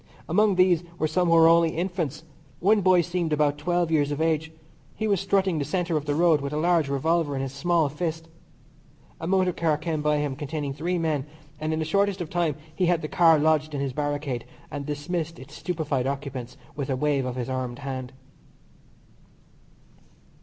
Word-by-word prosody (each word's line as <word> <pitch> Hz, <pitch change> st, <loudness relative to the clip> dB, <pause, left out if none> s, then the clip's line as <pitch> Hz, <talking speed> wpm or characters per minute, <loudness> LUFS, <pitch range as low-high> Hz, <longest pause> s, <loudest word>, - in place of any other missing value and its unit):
Among 210 Hz, -2 st, +3 dB
these 180 Hz, -2 st, +4 dB
were 155 Hz, -, +1 dB
some 175 Hz, +3 st, +1 dB
who 165 Hz, -, +4 dB
were 165 Hz, 0 st, +7 dB
only 165 Hz, -1 st, +4 dB
infants 170 Hz, -4 st, -2 dB, 0.4 s
one 205 Hz, +4 st, +4 dB
boy 185 Hz, -1 st, +5 dB
seemed 175 Hz, -1 st, -2 dB
about 145 Hz, -1 st, +1 dB
twelve 175 Hz, +1 st, 0 dB
years 145 Hz, -3 st, +2 dB
of 145 Hz, -, -3 dB
age. 160 Hz, 0 st, 0 dB, 0.4 s
He 220 Hz, -, -2 dB
was 200 Hz, -4 st, +2 dB
strutting 195 Hz, -4 st, +1 dB
the -, -, 0 dB
centre 170 Hz, +3 st, -1 dB
of 150 Hz, -1 st, -1 dB
the 145 Hz, -, +1 dB
road 165 Hz, -2 st, +4 dB
with 140 Hz, +1 st, -4 dB
a -, -, -1 dB
large 165 Hz, -2 st, +2 dB
revolver 150 Hz, +2 st, +1 dB
in 135 Hz, -, -2 dB
his 135 Hz, -1 st, -5 dB
small 165 Hz, +2 st, +2 dB
fist. 160 Hz, +2 st, -4 dB, 0.9 s
A 165 Hz, -, -4 dB
motor 185 Hz, -1 st, +2 dB
car 160 Hz, -3 st, +1 dB
came 155 Hz, -1 st, -2 dB
by 150 Hz, 0 st, +2 dB
him 145 Hz, -2 st, -1 dB
containing 145 Hz, 0 st, -4 dB
three 170 Hz, +5 st, -2 dB
men, 155 Hz, -4 st, -1 dB, 0.3 s
and 155 Hz, +1 st, -2 dB
in 155 Hz, -, 0 dB
the 160 Hz, -, -1 dB
shortest 200 Hz, +4 st, +1 dB
of 170 Hz, -3 st, -5 dB
time 170 Hz, -4 st, 0 dB, 0.2 s
he 180 Hz, +2 st, +1 dB
had 170 Hz, -2 st, +1 dB
the -, -, -2 dB
car 165 Hz, -1 st, +5 dB
lodged 155 Hz, 0 st, +1 dB
in -, -, -2 dB
his 135 Hz, -2 st, -2 dB
barricade, 145 Hz, -4 st, -2 dB, 0.3 s
and 145 Hz, -1 st, -5 dB
dismissed 160 Hz, +3 st, -3 dB
its 130 Hz, -, -12 dB
stupified 155 Hz, -7 st, -2 dB
occupants 135 Hz, -3 st, -5 dB, 0.2 s
with 140 Hz, -1 st, -4 dB
a 135 Hz, -, +1 dB
wave 140 Hz, 0 st, +1 dB
of 125 Hz, -1 st, -3 dB
his 125 Hz, -2 st, -3 dB
armed 130 Hz, -2 st, -3 dB
hand. 130 Hz, -2 st, -5 dB
155 Hz, 195 wpm, -25 LUFS, 145-175 Hz, 0.9 s, were